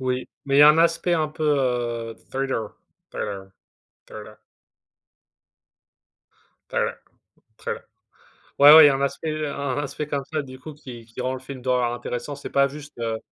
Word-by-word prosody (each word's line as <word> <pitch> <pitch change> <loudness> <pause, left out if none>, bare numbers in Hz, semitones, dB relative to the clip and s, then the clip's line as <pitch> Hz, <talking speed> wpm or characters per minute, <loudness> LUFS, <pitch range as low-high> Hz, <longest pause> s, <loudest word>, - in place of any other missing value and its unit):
Oui, 130 0 -2 0.2
mais 140 0 +1
il - - +6
y - - +10
a 150 - +10
un 150 +2 +5
aspect 170 +1 +2
un 155 -2 0
peu, 155 +1 -5
heu, 120 -5 0 0.2
thriller 130 -5 -2 0.4
thriller 95 -2 -5 0.6
thriller. 105 0 -11 2.3
Thriller - - -1 0.6
thriller. - - -5 0.8
Ouais, 145 +2 +10
ouais, 160 - +11
il - - +9
y - - +6
a 135 - +1
un 135 - -3
aspect 155 +2 -2
un 140 -2 -3
aspect 145 +1 -4
comme 140 -2 -2
ça, 155 - -1
du 130 -2 -11
coup 155 +3 -9
qui 125 -5 -11
qui 115 +2 -8
rend 130 +1 -1
le 130 - -5
film 130 0 -9
d'horreur 125 -1 +1
intéressant, 120 +3 -5
c'est 140 - -8
pas 140 0 +3
juste, 145 0 -11
heu 115 -1 -2
135 Hz, 175 wpm, -23 LUFS, 120-145 Hz, 2.3 s, ouais